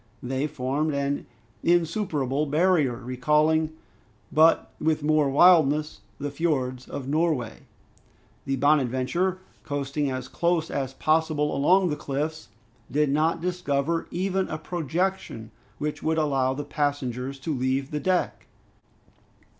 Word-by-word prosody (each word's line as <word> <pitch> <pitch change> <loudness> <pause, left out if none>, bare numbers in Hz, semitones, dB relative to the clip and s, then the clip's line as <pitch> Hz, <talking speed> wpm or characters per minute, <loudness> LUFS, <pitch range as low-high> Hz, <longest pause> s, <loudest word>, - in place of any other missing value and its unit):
They 135 +3 -1
formed 145 +2 -1
an 140 0 -2 0.3
insuperable 160 - +1
barrier, 155 -4 +2
recalling, 150 +6 +1 0.6
but 160 +2 +4
with 155 -1 +1
more 150 -1 +3
wildness, 155 -1 +4 0.2
the 145 0 -3
fiords 130 -5 -1
of 135 -2 -6
Norway. 150 -5 -1 0.8
The 135 - 0
"Bonadventure," 145 +6 +1 0.3
coasting 145 0 -2
as 130 -1 -4
close 170 +2 0
as 135 -1 -3
possible 155 -1 +1
along 180 +7 +4
the - - 0
cliffs, 150 +2 -4 0.4
did 145 +1 +1
not 160 +3 +1
discover 165 -3 -1
even 190 +1 -1
a 155 - -4
projection 165 - -3 0.3
which 150 0 -3
would 160 0 0
allow 135 -4 +1
the 145 +1 -5
passengers 140 -3 -2
to 160 - -2
leave 130 +1 -1
the 150 - -2
deck. 185 +2 -1
150 Hz, 120 wpm, -26 LUFS, 135-160 Hz, 0.8 s, but